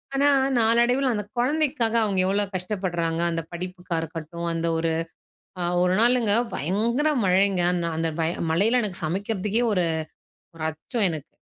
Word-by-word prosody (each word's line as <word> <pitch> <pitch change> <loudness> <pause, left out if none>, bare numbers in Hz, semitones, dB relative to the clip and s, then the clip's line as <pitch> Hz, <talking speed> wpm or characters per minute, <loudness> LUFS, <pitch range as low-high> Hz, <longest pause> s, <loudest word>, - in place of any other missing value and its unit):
ஆனா, 285 +1 +3 0.3
நாளடைவில 240 +4 +3
அந்த 210 -1 -2
குழந்தைக்காக 255 -3 +1
அவங்க 195 -3 0
எவ்வளோ 200 +2 +2
கஷ்டப்படுறாங்க, 180 -3 -2
அந்த 165 0 -2
படிப்புக்கா 180 0 -5
இருக்கட்டும் 165 +1 -6
அந்த 165 0 -1
ஒரு 165 0 0 0.7
அ - - 0 0.2
ஒரு 180 0 +2
நாளுங்க 235 -3 +4 0.2
பயங்கர 230 - 0 0.2
மழைங்க, 190 0 +3 0.2
நான் 165 -1 -2
அந்த 165 0 0
பய 165 +1 +1 0.2
மழையில 225 +9 +3
எனக்கு 185 -5 -4
சமைக்கிறதுக்கே 205 +5 -1
ஒரு 180 -3 +1 0.7
ஒரு 155 - -5
அச்சம் 200 - -2
எனக்கு. 155 0 -6
190 Hz, 140 wpm, -24 LUFS, 170-230 Hz, 0.7 s, நாளுங்க